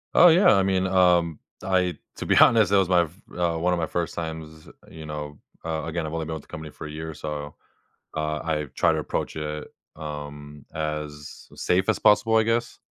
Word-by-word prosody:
Oh, 175 +1 +9
yeah. 175 - +6
I 95 - +3
mean, 95 -1 +1
um, 90 -4 +3 0.2
I 90 -3 +1 0.2
to - - -6
be - - +3
honest, 110 -4 +6
that 100 - +5
was 95 -1 +2
my 90 -1 +5
f 85 +5 -11 0.2
uh, 85 -2 +1
one 90 +2 +1
of 85 - 0
my 80 - 0
1st 85 0 -3
times, 80 -1 -6 0.2
you 80 -1 -10
know, 75 -1 -6 0.3
uh 80 -1 -2
again, 80 0 -3
I've 80 - -5
only 80 -1 -2
been 80 - -4
with 80 - -6
the - - -23
company 80 -1 -8
for 75 - -8
a - - -8
year, 80 +1 -6
so, 75 -1 -6 0.6
uh, 75 0 -1
I've 75 -4 -3
tried - - +3
to - - -1
approach - - -3
it, 75 0 -4 0.3
um, 75 -2 -8
as 75 -1 -5
safe 90 +1 +1
as - - +2
possible, 105 +2 +4
I 110 - +5
guess. 115 +2 -1
80 Hz, 215 wpm, -25 LUFS, 75-90 Hz, 0.6 s, Oh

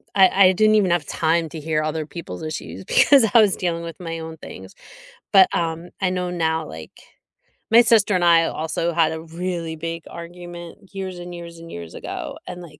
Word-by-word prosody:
I 190 0 +6
I - - +5
didn't 215 +3 +4
even 200 -4 +3
have 170 -3 +1
time 165 +1 +1
to 160 - -7
hear 155 0 -1
other 155 0 -2
people's 150 - -8
issues, 155 -11 -6
because 275 -5 +5
I 235 - +8
was 205 -2 +3
dealing 170 -2 -2
with 165 -1 -7
my 165 -1 -5
own 160 0 -7
things, - - -11 0.6
but, 190 -2 +8
um, 165 +1 -2
I 190 - +2
know 180 -1 -2
now, 160 -2 -1
like 80 0 -10 0.8
my 230 +1 +8
sister 220 -4 +3
and 180 - +1
I 165 -1 +6
also 165 +2 -2
had 160 -1 +3
a 160 - -6
really 165 0 -4
big 165 +1 -5
argument 175 +3 -10
years 190 -2 -5
and 175 0 -8
years 170 -1 -9
and 165 0 -11
years 85 -1 -8
ago, - - -6
and, 180 - -7
like 155 -4 -13
170 Hz, 200 wpm, -22 LUFS, 160-180 Hz, 0.8 s, I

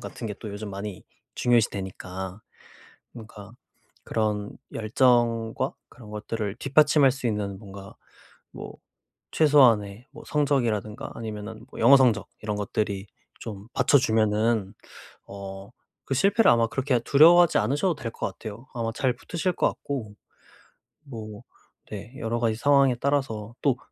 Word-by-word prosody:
같은 115 - -7
게 105 - -4
또 110 - -6
요즘 100 +1 -6
많이 100 -1 -7 0.3
중요시되니까 95 -4 -1 0.7
그러니까 105 -2 -11 0.5
그런 105 -2 -2 0.2
열정과 115 +1 +1 0.2
그런 115 -4 -14
것들을 105 -1 -4
뒷받침할 140 +1 +4
수 135 -2 -5
있는 100 -3 -2
뭔가 100 -2 -11 0.6
뭐 - - -9 0.6
최소한의 120 -8 +4
뭐 150 - -12
성적이라든가 120 -8 -1
아니면은 110 0 -7
뭐 - - -10
영어 135 +5 +7
성적 120 -6 +2
이런 105 -1 -3
것들이 100 -1 -2 0.3
좀 105 -2 -8
받쳐주면은 110 -4 +2 0.6
어 100 0 -9 0.4
그 135 - 0
실패를 200 - +3
아마 115 -1 +2
그렇게 130 -1 0
두려워하지 170 +7 +6
않으셔도 145 - +1
될 120 -5 -5
것 - - -3
같아요. 110 +3 -8
아마 115 -2 -2
잘 130 -1 +1
붙으실 180 +2 -2
것 - - 0
같고 115 -7 -6 0.9
뭐 110 -6 -9 0.5
네 105 +4 -8
여러 115 -2 -2
가지 115 -2 +1
상황에 140 +1 +4
따라서 120 -5 -2
또 135 -4 +2
115 Hz, 290 characters per minute, -25 LUFS, 105-130 Hz, 0.9 s, 영어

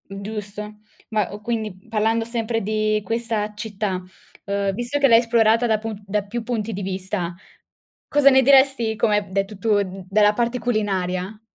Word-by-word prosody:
Giusto. 210 +1 -7 0.3
Ma, 215 -4 0
uhm, 205 +1 -8
quindi, 215 -4 -4
parlando 225 +1 +1
sempre 230 -1 -2
di 215 +1 0
questa 225 -1 -2
città, 205 -3 -3 0.4
ehm, 200 -1 -1
visto 240 +6 -2
che 280 - +5
l'hai 230 -2 +7
esplorata 230 0 +3
da 220 -1 +2
pun 215 -1 -6
da 205 +1 -1
più 225 +4 -5
punti 225 -2 -3
di 200 - -4
vista, 185 -2 -3 0.7
cosa 290 -1 +5
ne 265 -1 +6
diresti 265 -4 +4
come 215 -2 +2
hai - - +1
b 195 - -16
detto 195 +1 -2
tu 205 0 +2
d 190 -1 -6
dalla 210 +1 +4
parte 235 +2 -1
culinaria? 195 -3 -2
215 Hz, 170 wpm, -22 LUFS, 200-230 Hz, 0.7 s, l'hai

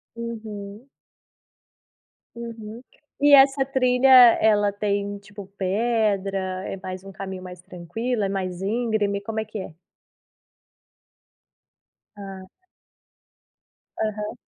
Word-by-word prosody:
Uhum. 220 -1 -7 1.5
Uhum. 230 0 -8 0.4
E 290 0 +6
essa 270 0 +7
trilha 260 -1 +2 0.3
ela 210 -2 +4
tem, 205 0 -2
tipo, 200 -1 -11
pedra, 200 -1 0 0.3
é - - -4
mais 185 0 -6
um 195 - -9
caminho 190 -1 -7
mais 180 -1 -10
tranquilo, 200 +6 -4
é 195 - 0
mais 185 -2 -3
íngreme, 210 -1 0
como 220 +2 -4
é 220 - -3
que 215 0 -7
é? 175 -4 -8 2.4
Ah. 195 -1 -9 1.6
Aham. 210 -1 -3
210 Hz, 100 wpm, -24 LUFS, 195-230 Hz, 2.4 s, essa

